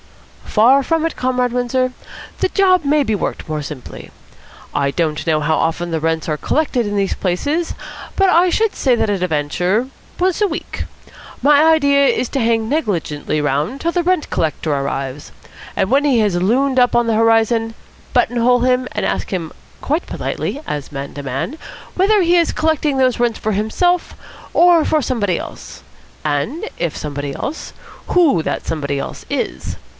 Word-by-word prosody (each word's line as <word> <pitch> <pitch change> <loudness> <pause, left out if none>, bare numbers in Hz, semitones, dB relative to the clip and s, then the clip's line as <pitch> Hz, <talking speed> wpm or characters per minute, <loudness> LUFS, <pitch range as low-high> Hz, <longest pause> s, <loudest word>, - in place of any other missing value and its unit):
"Far 255 +6 +4
from 325 +2 0
it, 330 - -2
Comrade 250 -1 0
Windsor. 250 +1 0 0.5
The - - +1
job 370 -3 +3
may 295 +1 +3
be 220 -5 0
worked 200 - -4
more 155 -1 -3
simply. 145 -3 -9 0.6
I 140 -1 +1
don't 155 -1 -1
know 160 -2 +2
how 155 +1 +1
often 170 +1 -1
the 165 - 0
rents 160 0 -1
are 155 - 0
collected 255 - 0
in 205 0 -2
these 195 -1 +1
places, 285 - -1 0.4
but 390 - +4
I 360 0 +4
should 440 +4 +1
say 250 -4 +2
at - - +1
a 190 -3 0
venture 180 - 0 0.3
once 370 +2 +1
a 415 - +4
week. 325 - -5 0.6
My 290 +1 +5
idea 285 -3 +4
is 255 - +1
to 275 - -1
hang 225 -1 +1
negligently 170 - -1
round 150 - -1
till 335 +3 -1
the 350 - +1
rent 365 -3 +1
collector 155 -1 -1
arrives, 140 +1 -3 0.4
and 190 - 0
when 275 +2 +3
he 275 -5 +3
has 205 -4 +2
loomed 255 +9 +2
up 245 0 +3
on 240 - +3
the 225 - +2
horizon, 225 0 +2 0.4
buttonhole 245 0 +2
him 255 0 +2
and - - -2
ask - - -2
him 175 -4 -3 0.3
quite 310 +5 -1
politely, 290 - -4
as 145 -1 -4
man 140 -1 -6
to 145 - -7
man, 135 - -3 0.4
whether 400 +2 +3
he 345 +1 +3
is 340 -2 +3
collecting 315 -3 0
those 255 -2 +2
rents 240 -2 +1
for 215 - -1
himself 340 - 0 0.4
or 345 -2 +5
for 310 0 +1
somebody 205 -9 0
else, - - -9 0.4
and 155 - -1
if 170 -3 -2
somebody 145 -1 -4
else, 305 - -5 0.4
who 310 - +3
that - - -3
somebody 140 -3 -2
else - - -6
is. 65 - -3
235 Hz, 175 wpm, -18 LUFS, -, 0.6 s, My